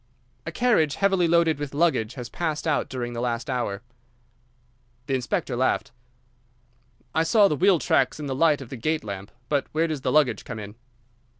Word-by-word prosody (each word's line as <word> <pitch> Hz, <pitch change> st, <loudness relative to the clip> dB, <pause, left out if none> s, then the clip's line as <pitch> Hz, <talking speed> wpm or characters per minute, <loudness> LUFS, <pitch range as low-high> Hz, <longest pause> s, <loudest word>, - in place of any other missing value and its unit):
"A -, -, -2 dB
carriage 215 Hz, -, +2 dB
heavily 190 Hz, -3 st, +2 dB
loaded 165 Hz, -2 st, +3 dB
with 145 Hz, -1 st, -5 dB
luggage 145 Hz, -8 st, +1 dB
has 125 Hz, -3 st, -6 dB
passed 155 Hz, +4 st, -3 dB
out 155 Hz, -, 0 dB
during 120 Hz, -2 st, -4 dB
the 115 Hz, -, -4 dB
last 120 Hz, +1 st, -2 dB
hour." 115 Hz, -4 st, -2 dB, 1.2 s
The 135 Hz, -, -2 dB
inspector 130 Hz, +2 st, -1 dB
laughed. 130 Hz, -1 st, 0 dB, 1.2 s
"I 160 Hz, -, +2 dB
saw 200 Hz, +5 st, +5 dB
the 150 Hz, -, 0 dB
wheel 185 Hz, +4 st, +4 dB
tracks 155 Hz, -, +1 dB
in 150 Hz, -, -5 dB
the 135 Hz, -, -2 dB
light 150 Hz, +1 st, +3 dB
of 130 Hz, -, -9 dB
the 135 Hz, -, -6 dB
gate 155 Hz, +6 st, -1 dB
lamp, 100 Hz, -1 st, -6 dB, 0.2 s
but 145 Hz, -2 st, 0 dB
where 160 Hz, +2 st, +2 dB
does 155 Hz, -4 st, -3 dB
the 130 Hz, -, 0 dB
luggage 145 Hz, -6 st, +2 dB
come 115 Hz, -, -7 dB
in?" 105 Hz, -1 st, -7 dB
145 Hz, 185 wpm, -25 LUFS, 120-165 Hz, 1.2 s, saw